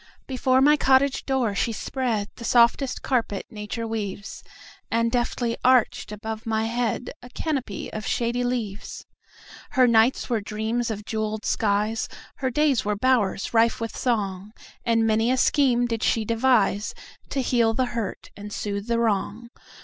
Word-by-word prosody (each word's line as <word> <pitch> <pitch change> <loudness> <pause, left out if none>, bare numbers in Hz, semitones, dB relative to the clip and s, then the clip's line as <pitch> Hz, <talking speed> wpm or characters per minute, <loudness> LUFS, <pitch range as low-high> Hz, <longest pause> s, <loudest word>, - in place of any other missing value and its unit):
Before 260 0 +2
my 295 +2 +6
cottage 270 0 +3
door 260 -6 +1
she 230 +4 0
spreadThe 230 -2 -3
softest 240 +3 +3
carpet 230 -6 -1
nature 215 +1 -5
weaves, 210 -3 -5 0.5
And 230 0 +1
deftly 240 -1 -1
arched 250 -4 +3
above 220 +1 -6
my 220 0 0
headA 235 +1 -2 0.2
canopy 270 - -3
of 215 - -5
shady 240 +1 0
leaves. 230 -5 -4 0.7
Her 260 -1 +5
nights 230 +2 +3
were 230 -4 0
dreams 220 +3 -2
of 210 -1 -5
jeweled 215 -1 -3
skies, 210 +1 0 0.3
Her 260 - -1
days 285 -1 +2
were 210 0 0
bowers 215 -4 +1
rife 230 0 +3
with 230 -1 -4
song, 205 -4 -2 0.3
And 230 -1 +2
many 225 +1 +2
a 260 - +2
scheme 255 -3 +3
did 230 -2 -2
she 220 0 +1
deviseTo 225 -3 +2 0.5
heal 235 -2 +2
the 255 +1 +2
hurt 225 -5 -4
and 205 +1 -9
soothe 200 0 -4
the 235 0 +1
wrong. 230 +1 -1
230 Hz, 145 wpm, -24 LUFS, 215-250 Hz, 0.7 s, my